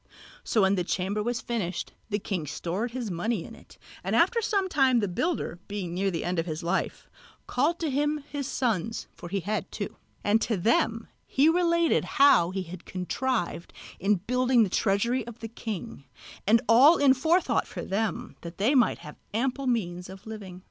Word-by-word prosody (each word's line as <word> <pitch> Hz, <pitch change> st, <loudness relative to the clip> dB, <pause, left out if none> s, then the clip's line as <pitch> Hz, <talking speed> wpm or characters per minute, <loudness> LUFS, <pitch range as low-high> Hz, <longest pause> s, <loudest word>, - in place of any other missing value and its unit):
So 220 Hz, -, +2 dB
when 190 Hz, +1 st, +4 dB
the 180 Hz, -3 st, +1 dB
chamber 195 Hz, +4 st, -1 dB
was 240 Hz, +2 st, -2 dB
finished, 195 Hz, -7 st, -3 dB, 0.2 s
the 205 Hz, -, 0 dB
king 190 Hz, -6 st, -3 dB
stored 180 Hz, -, -3 dB
his 235 Hz, -4 st, -4 dB
money 180 Hz, +2 st, -1 dB
in -, -, -10 dB
it, -, -, -16 dB, 0.3 s
and -, -, -1 dB
after 470 Hz, -1 st, +3 dB
some 400 Hz, -3 st, +1 dB
time 265 Hz, -7 st, +3 dB
the 205 Hz, -, 0 dB
builder, 185 Hz, -, -2 dB
being 195 Hz, -4 st, -4 dB
near 195 Hz, +2 st, 0 dB
the 170 Hz, -3 st, -3 dB
end 175 Hz, -1 st, -1 dB
of 165 Hz, -, -2 dB
his 155 Hz, 0 st, -4 dB
life, 175 Hz, +3 st, -2 dB, 0.4 s
called 295 Hz, +7 st, +1 dB
to 315 Hz, -3 st, 0 dB
him 295 Hz, +2 st, 0 dB
his 280 Hz, -2 st, -4 dB
sons 225 Hz, -, -1 dB
(for 175 Hz, -, -10 dB
he 195 Hz, +1 st, -1 dB
had 210 Hz, +5 st, -3 dB
two) -, -, -5 dB, 0.3 s
and 215 Hz, +2 st, +3 dB
to 220 Hz, -, 0 dB
them 225 Hz, +3 st, +1 dB, 0.2 s
he 285 Hz, +4 st, +4 dB
related 340 Hz, -1 st, +3 dB
how 275 Hz, -, +6 dB
he 190 Hz, 0 st, -3 dB
had 180 Hz, 0 st, -9 dB
contrived 185 Hz, 0 st, -2 dB, 0.3 s
in 205 Hz, +3 st, +3 dB
building 250 Hz, +5 st, +2 dB
the 200 Hz, -, 0 dB
treasury 230 Hz, +7 st, +1 dB
of 235 Hz, -1 st, -8 dB
the 225 Hz, -, -6 dB
king, 225 Hz, -6 st, -6 dB, 0.4 s
and 225 Hz, +3 st, +5 dB
all 270 Hz, +9 st, +7 dB
in 280 Hz, -2 st, +6 dB
forethought 320 Hz, +8 st, +2 dB
for -, -, -6 dB
them, 225 Hz, +4 st, -2 dB
that 170 Hz, 0 st, -9 dB
they 220 Hz, +8 st, +2 dB
might 250 Hz, -4 st, +4 dB
have 150 Hz, -, -11 dB, 0.2 s
ample 265 Hz, +3 st, -1 dB
means 180 Hz, -7 st, -1 dB
of 190 Hz, 0 st, -11 dB
living. 200 Hz, -5 st, -8 dB
220 Hz, 190 wpm, -27 LUFS, 185-260 Hz, 0.4 s, all